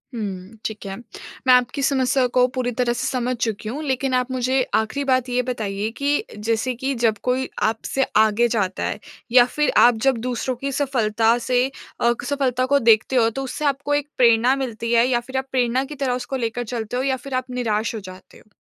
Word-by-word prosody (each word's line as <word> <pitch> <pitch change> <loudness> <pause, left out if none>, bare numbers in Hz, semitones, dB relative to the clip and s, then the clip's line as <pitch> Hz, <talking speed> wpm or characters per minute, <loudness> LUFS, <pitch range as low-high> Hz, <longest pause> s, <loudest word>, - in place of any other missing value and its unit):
हुँ, 200 -1 -6
ठीक 215 -2 -5
है। 195 -1 -5 0.5
मैं 255 - +8
आपकी 250 +3 +2
समस्या 265 -2 +2
को 250 - +6
पूरी 250 -1 -1
तरह 240 -1 +2
से - - -2
समझ 250 0 -1
चुकी 225 -3 -3
हूँ। 290 +7 -5
लेकिन 265 -2 -1
आप 250 0 0
मुझे 255 +1 +1
आखिरी 220 +6 0
बात 255 -1 +1
ये 250 0 +1
बताइए 210 -3 -2
कि 290 +8 0
जैसे 225 +4 -1
कि 265 +3 -2
जब 215 -2 +2
कोई 255 +1 0
आपसे 225 +5 0
आगे 220 +2 +4
जाता 200 -5 -1
है 210 - -2 0.3
या 245 -1 +7
फिर 300 0 +2
आप 240 0 +6
जब 265 -3 +3
दूसरों 250 +1 -2
की 275 +3 -4
सफलता 235 -4 +1
से 250 0 +3 0.4
अ, 235 0 +4 0.2
सफलता 255 -3 0
को 280 +2 +3
देखते 225 +1 +3
हो 230 -2 +4
तो 270 +4 -5
उससे 295 +3 -4
आपको 285 +1 0
एक 290 0 0
प्रेरणा 240 +2 +4
मिलती 235 -4 -4
है? 235 +1 +5
या 245 -2 +2
फिर 260 +2 -6
आप 265 - -2
प्रेरणा 250 0 +1
की 295 +2 -8
तरह 270 -3 -1
उसको 250 +2 -4
लेकर 235 0 -2
चलते 230 0 -4
हो? 255 - 0
या 270 -1 +1
फिर 275 +1 -9
आप 255 0 -2
निराश 230 -3 -1
हो 220 - -4
जाते 185 -1 -13
हो? 215 - -22
250 Hz, 210 wpm, -22 LUFS, 225-265 Hz, 0.5 s, मैं